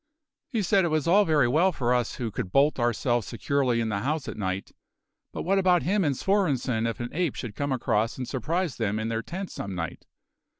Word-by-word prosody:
He 230 Hz, -7 st, -1 dB
said 195 Hz, +1 st, +3 dB
it -, -, +2 dB
was 155 Hz, -3 st, 0 dB
all 200 Hz, +4 st, +5 dB
very 150 Hz, -7 st, +3 dB
well 165 Hz, +10 st, +3 dB
for 125 Hz, -6 st, 0 dB
us 125 Hz, -2 st, 0 dB
who 115 Hz, -3 st, -3 dB
could 90 Hz, -, -4 dB
bolt 140 Hz, +3 st, +3 dB
ourselves 120 Hz, -1 st, +1 dB
securely 125 Hz, 0 st, 0 dB
in 115 Hz, -1 st, 0 dB
the 100 Hz, -2 st, -1 dB
house 145 Hz, +6 st, -2 dB
at -, -, -5 dB
night; 95 Hz, -1 st, -3 dB, 0.6 s
but -, -, -5 dB
what 195 Hz, +3 st, +2 dB
about 180 Hz, -2 st, +3 dB
him 200 Hz, +2 st, +1 dB
and 140 Hz, -5 st, 0 dB
Svorenssen 135 Hz, -, +1 dB
if 115 Hz, -, -3 dB
an 120 Hz, 0 st, -3 dB
ape 170 Hz, -4 st, 0 dB
should 115 Hz, -4 st, -5 dB
come 145 Hz, -1 st, -2 dB
across 115 Hz, -3 st, 0 dB
and 125 Hz, -2 st, -4 dB
surprise 160 Hz, +2 st, -2 dB
them 105 Hz, -2 st, -1 dB
in 110 Hz, +1 st, -2 dB
their 115 Hz, 0 st, -1 dB
tent 185 Hz, +8 st, -6 dB
some 100 Hz, -2 st, -5 dB
night? 85 Hz, -2 st, -5 dB
130 Hz, 220 wpm, -27 LUFS, 115-170 Hz, 0.6 s, all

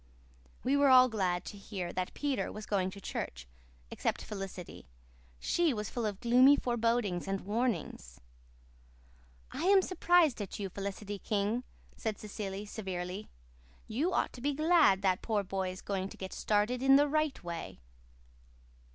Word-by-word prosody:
We 265 Hz, +3 st, +2 dB
were 285 Hz, -1 st, +5 dB
all 255 Hz, -1 st, +8 dB
glad 185 Hz, -5 st, -1 dB
to 205 Hz, -, -8 dB
hear 185 Hz, -4 st, -5 dB
that 185 Hz, 0 st, -3 dB
Peter 285 Hz, -3 st, -1 dB
was 215 Hz, 0 st, -7 dB
going 190 Hz, -3 st, 0 dB
to 200 Hz, -, -10 dB
church, 60 Hz, -, -5 dB, 0.4 s
except -, -, -2 dB
Felicity. 195 Hz, -, -7 dB, 0.5 s
She 335 Hz, -, +1 dB
was 210 Hz, -1 st, -4 dB
full 235 Hz, -3 st, -1 dB
of 200 Hz, -2 st, -4 dB
gloomy 255 Hz, +4 st, +6 dB
forebodings 230 Hz, -8 st, 0 dB
and 195 Hz, 0 st, -1 dB
warnings. 205 Hz, -, -2 dB, 1.3 s
"I'm 380 Hz, +4 st, +4 dB
surprised 350 Hz, -, +3 dB
at 200 Hz, -, -5 dB
you, 200 Hz, -2 st, -4 dB
Felicity 200 Hz, +1 st, -5 dB
King," 210 Hz, +5 st, -1 dB, 0.3 s
said 220 Hz, -2 st, -3 dB
Cecily 205 Hz, -1 st, -5 dB
severely. 190 Hz, -1 st, -5 dB, 0.6 s
"You 285 Hz, +12 st, 0 dB
ought -, -, 0 dB
to 245 Hz, -, -10 dB
be 285 Hz, +2 st, 0 dB
glad 310 Hz, -, +4 dB
that 185 Hz, -2 st, +2 dB
poor 215 Hz, -3 st, 0 dB
boy 190 Hz, -1 st, -2 dB
is 185 Hz, +1 st, -8 dB
going 195 Hz, -1 st, -2 dB
to -, -, -12 dB
get 190 Hz, -1 st, -6 dB
started 215 Hz, +4 st, +1 dB
in 270 Hz, 0 st, +6 dB
the 290 Hz, +1 st, +5 dB
right 305 Hz, -4 st, 0 dB
way." 170 Hz, -1 st, -6 dB
210 Hz, 150 wpm, -32 LUFS, 190-255 Hz, 1.3 s, all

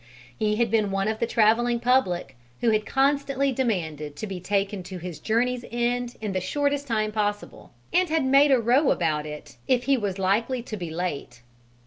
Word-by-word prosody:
He 210 Hz, -, 0 dB
had 230 Hz, -1 st, +1 dB
been 215 Hz, -3 st, +2 dB
one 195 Hz, +1 st, -1 dB
of 220 Hz, 0 st, -2 dB
the 235 Hz, -, 0 dB
travelling 235 Hz, +2 st, +3 dB
public 230 Hz, -, +1 dB, 0.3 s
who 235 Hz, -, +3 dB
had 215 Hz, -1 st, 0 dB
constantly 275 Hz, 0 st, +1 dB
demanded 160 Hz, -, -2 dB
to 180 Hz, -, -5 dB
be 195 Hz, -3 st, -5 dB
taken 200 Hz, +1 st, -1 dB
to 185 Hz, +1 st, -8 dB
his 175 Hz, -3 st, -7 dB
journey's 245 Hz, +2 st, 0 dB
end 240 Hz, +1 st, -1 dB
in 215 Hz, -2 st, -3 dB
the 185 Hz, -, -1 dB
shortest 285 Hz, +7 st, -1 dB
possible 215 Hz, -2 st, -2 dB, 0.3 s
time, 360 Hz, -, +5 dB
and 365 Hz, -, -3 dB
had 315 Hz, -3 st, +1 dB
"made 275 Hz, +2 st, +5 dB
a 265 Hz, -, +6 dB
row" 250 Hz, +6 st, +3 dB
about 155 Hz, -3 st, 0 dB
it 150 Hz, 0 st, -9 dB
if 250 Hz, -2 st, +2 dB
he 275 Hz, +1 st, +2 dB
was 200 Hz, -4 st, -2 dB
likely 230 Hz, +6 st, 0 dB
to 225 Hz, -, -6 dB
be 175 Hz, -5 st, -5 dB
late. 155 Hz, -8 st, -5 dB
220 Hz, 190 wpm, -25 LUFS, 185-250 Hz, 0.3 s, a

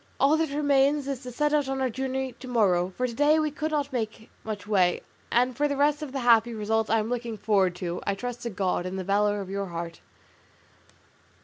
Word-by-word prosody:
All 280 Hz, +3 st, +5 dB
that 320 Hz, -1 st, 0 dB
remains 285 Hz, 0 st, +2 dB
is 275 Hz, -3 st, -3 dB
to 250 Hz, -2 st, -7 dB
set 295 Hz, +4 st, 0 dB
out 290 Hz, -3 st, +2 dB
on 270 Hz, 0 st, -2 dB
our 260 Hz, -, +1 dB
journey 265 Hz, +1 st, -2 dB
to 255 Hz, -, -9 dB
morrow, 190 Hz, -7 st, +2 dB
for 255 Hz, -, +1 dB
to 245 Hz, -, -3 dB
day 295 Hz, +5 st, +4 dB
we 310 Hz, -1 st, +1 dB
could 305 Hz, +2 st, -3 dB
not 290 Hz, -2 st, -2 dB
make 220 Hz, -2 st, -4 dB
much 215 Hz, -2 st, -5 dB
way; 185 Hz, -4 st, +2 dB, 0.3 s
and 250 Hz, +1 st, +2 dB
for 295 Hz, +4 st, +1 dB
the 285 Hz, -1 st, -2 dB
rest 295 Hz, +1 st, +2 dB
of 300 Hz, -3 st, -5 dB
the 270 Hz, -1 st, -3 dB
happy 235 Hz, -1 st, +4 dB
result 220 Hz, +1 st, 0 dB
I 225 Hz, -, +3 dB
am 220 Hz, 0 st, -1 dB
looking 235 Hz, -2 st, -3 dB
forward 195 Hz, -4 st, +2 dB
to, 175 Hz, -1 st, -4 dB
I 200 Hz, -, -1 dB
trust 245 Hz, +3 st, -5 dB
to 235 Hz, -, -3 dB
God 185 Hz, -3 st, -1 dB
and 185 Hz, +1 st, -4 dB
the 190 Hz, -, -3 dB
valour 205 Hz, +2 st, +1 dB
of 190 Hz, -, -7 dB
your 200 Hz, 0 st, -2 dB
heart." 170 Hz, -1 st, -6 dB
240 Hz, 230 wpm, -27 LUFS, 200-275 Hz, 0.3 s, All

